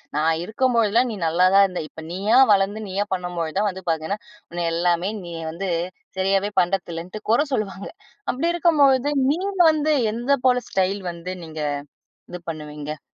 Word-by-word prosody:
நான் 160 +2 +2
இருக்கும்போதெல்லாம் 235 +2 +2
நீ - - -4
நல்லா 170 +3 +3
தான் 200 - +8
இருந்த. 185 -2 -3
இப்போ 160 - -11
நீயா 200 +6 +2
வளர்ந்து, 200 +1 +2
நீயா 195 +2 -1
பண்ணம்போது 175 -3 -3
தான் 210 +1 +2
வந்து 190 -1 -7
பார்த்தன்னா, 160 +5 -1 0.3
உன்னை 175 0 -2
எல்லாமே, 175 +2 +1
நீ 175 - -8 0.2
வந்து 185 +4 -4 0.5
சரியாவே 195 +2 +1
பண்ணுறதில்லன்ட்டு 175 +1 -3
கொர 245 +7 +4
சொல்லுவாங்க. 200 -4 -3 0.4
அப்படி 280 +7 -1
இருக்கம்பொழுது, 290 -5 +4 0.2
நீ 315 - 0 0.3
வந்து 310 0 +1 0.2
எந்த 240 +5 +1
போல 250 -1 +3
ஸ்டைல் 195 +1 0
வந்து 170 +2 -6
நீங்க 160 -1 -8 0.7
இது 180 - -7
பண்ணுவீங்க? 150 -1 -7
195 Hz, 150 wpm, -23 LUFS, 170-230 Hz, 0.7 s, தான்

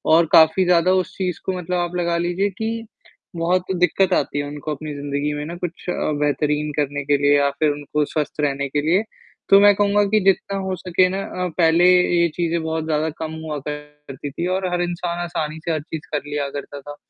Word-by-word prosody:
और 170 +1 +5
काफ़ी 160 +4 +6
ज़्यादा 175 0 +4
उस 185 -1 -1
चीज़ 180 -3 -2
को 190 -1 -1
मतलब 180 0 -3
आप 175 0 -2
लगा 170 -1 0
लीजिए 175 +4 0
कि, 225 +3 -4 0.5
बहुत 175 +2 +1
दिक्कत 180 +1 +2
आती 145 -3 0
है - - -1
उनको 145 +1 -6
अपनी 150 +1 -7
ज़िंदगी 145 +1 -2
में 145 0 -4
ना 170 +3 -6
कुछ 175 0 -5
बेहतरीन 150 -1 0
करने 145 -1 -1
के 145 0 +3
लिए 145 0 +3
या 140 0 +3
फिर 155 -1 +3
उनको 145 +1 -2
स्वस्थ 150 +1 -3
रहने 140 -1 0
के 145 +2 0
लिए, 175 +7 +2 0.5
तो 195 - +8
मैं 205 0 +7
कहूँगा 205 0 +3
कि 215 - +6
जितना 195 0 +2
हो 190 -1 -2
सके 185 +1 +2
ना 190 +1 -3
अ, 180 -1 -3
पहले 170 0 +4
ये 175 -1 +4
चीज़ें 170 -1 0
बहुत 160 0 -2
ज़्यादा 155 0 0
कम 160 -1 -4
हुआ 155 -1 -3
करती 150 -1 -7
थी 170 +5 -3
और 190 -1 -1
हर 175 - 0
इंसान 175 0 -3
आसानी 160 -2 -4
से 170 - 0
हर 155 -2 -1
चीज़ 155 +1 -8
कर 150 - +2
लिया 145 -1 -2
करता 145 0 -7
था, 145 +1 -9
165 Hz, 215 wpm, -21 LUFS, 150-180 Hz, 0.5 s, तो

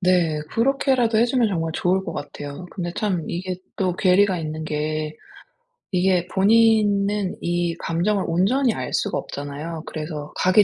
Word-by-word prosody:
네. 180 -4 +2
그렇게라도 250 -2 +2
해 230 - +5
주면 240 -2 +2
정말 165 -4 -1
좋을 190 +2 +1
것 165 - -4
같아요. 145 +3 -7
근데 175 -2 -4
참 185 -6 -1
이게 180 +1 -3 0.2
또 185 -2 0
괴리가 185 0 +4
있는 155 -1 -4
게 155 0 -2 0.8
이게 180 -1 +2
본인은 205 -1 +3
이 175 -1 0
감정을 185 +5 0
온전히 220 +9 +2
알 - - -4
수가 205 - 0
없잖아요. 150 +3 -6
그래서 150 -1 -6
가기 185 +3 +5
180 Hz, 300 characters per minute, -23 LUFS, 165-205 Hz, 0.8 s, 해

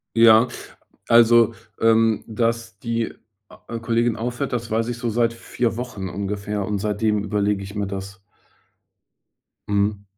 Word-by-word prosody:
Ja, 115 +1 +7 0.6
also, 115 -1 +5 0.3
ähm, 115 -1 +3
dass 115 -2 -2
die 115 0 -2 0.4
a 115 - -8
Kollegin 115 0 +1
aufhört, 120 +4 -3
das 120 -2 -3
weiß 115 +1 0
ich 120 - -4
so 120 0 -2
seit 115 +1 +1
4 115 0 -2
Wochen 110 -5 -5
ungefähr. 100 +1 -3
Und 105 +1 -2
seitdem 105 0 0
überlege 105 -1 0
ich 100 0 -9
mir 100 -1 -2
das. 95 0 -7 1.4
Mhm. 100 0 0
110 Hz, 135 wpm, -22 LUFS, 105-115 Hz, 1.4 s, Ja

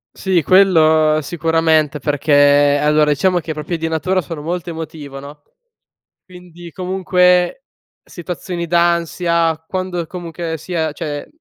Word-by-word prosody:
Sì, 185 -4 0
quello 160 -4 +4
sicuramente 160 -2 +1
perché 145 0 +3
allora, 150 0 +2
diciamo 175 +5 +1
che 160 -1 -5
proprio 155 +3 -5
di 165 - -2
natura 180 +4 -1
sono 155 -1 -8
molto 175 +2 -4
emotivo, 155 -4 -8
no, 145 +2 -12 0.9
quindi 175 -2 -13
comunque 180 +3 +1 0.4
situazioni 175 0 -6
d'ansia 170 -1 0
quando, 185 -2 -4
comunque 170 -1 -6
sia 160 -1 -3
cioè, 150 -2 -6
165 Hz, 115 wpm, -17 LUFS, 155-180 Hz, 0.9 s, quello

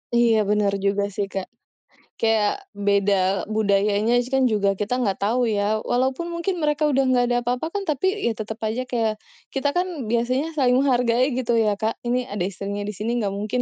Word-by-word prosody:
Iya 235 -2 +4
benar 210 -1 +2
juga 200 0 +1
sih 205 - 0
Kak. 190 -1 -2 0.7
Kayak, 225 - +1
beda 200 0 +2 0.4
budayanya 205 +2 +2 0.4
juga, 205 -2 +1
kan - - -21
kita 210 +4 -1
nggak 195 -3 -1
tahu 235 +5 +1
ya. 205 - 0 0.3
Walaupun 260 +7 0
mungkin 360 +2 -1
mereka 300 0 +1
udah 270 0 +3
nggak 250 -1 +3
ada 245 - +2
apa-apa, 250 +6 -1
kan 400 - -1
tapi 305 +4 0 0.2
ya - - +2
tetap 220 +1 -5
aja 240 +4 -2
kayak, 225 -3 +1 0.4
kita 280 +1 +1
kan, 360 +1 +1 0.2
biasanya 255 +7 0
saling 250 -4 +3
menghargai 250 -1 +2
gitu 240 -2 0
ya 215 -2 +2
Kak, 220 +1 -1
ini 250 +1 0
ada 205 -5 -3
istrinya 200 +2 -4
di - - -2
sini, 220 +5 -3
nggak 200 - -1
mungkin 215 +4 -1
230 Hz, 185 wpm, -23 LUFS, 205-255 Hz, 0.7 s, Iya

